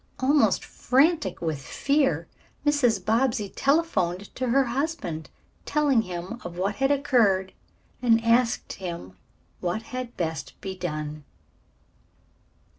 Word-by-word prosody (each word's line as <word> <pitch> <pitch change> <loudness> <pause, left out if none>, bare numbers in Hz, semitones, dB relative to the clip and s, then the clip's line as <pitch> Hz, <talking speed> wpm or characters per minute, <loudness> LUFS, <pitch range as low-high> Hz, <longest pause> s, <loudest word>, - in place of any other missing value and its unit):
Almost 280 +3 +3
frantic 270 - +2
with 155 -4 -2
fear, 275 - +1 0.4
Mrs. 245 -10 +2
Bobbsey 225 -2 +1
telephoned 210 - 0
to 255 - -2
her 270 +3 +4
husband, 255 - -3 0.3
telling 290 -6 +2
him 185 +4 -6
of 175 0 -7
what 195 +3 -1
had 270 0 +2
occurred 235 -10 +2 0.5
and 230 -2 +5
asked 235 +1 +2
him 170 - -6 0.5
what 180 +5 -2
had 255 -1 -5
best 160 -2 -4
be 190 -1 -5
done. 155 -4 -4
225 Hz, 115 wpm, -26 LUFS, 180-270 Hz, 0.5 s, and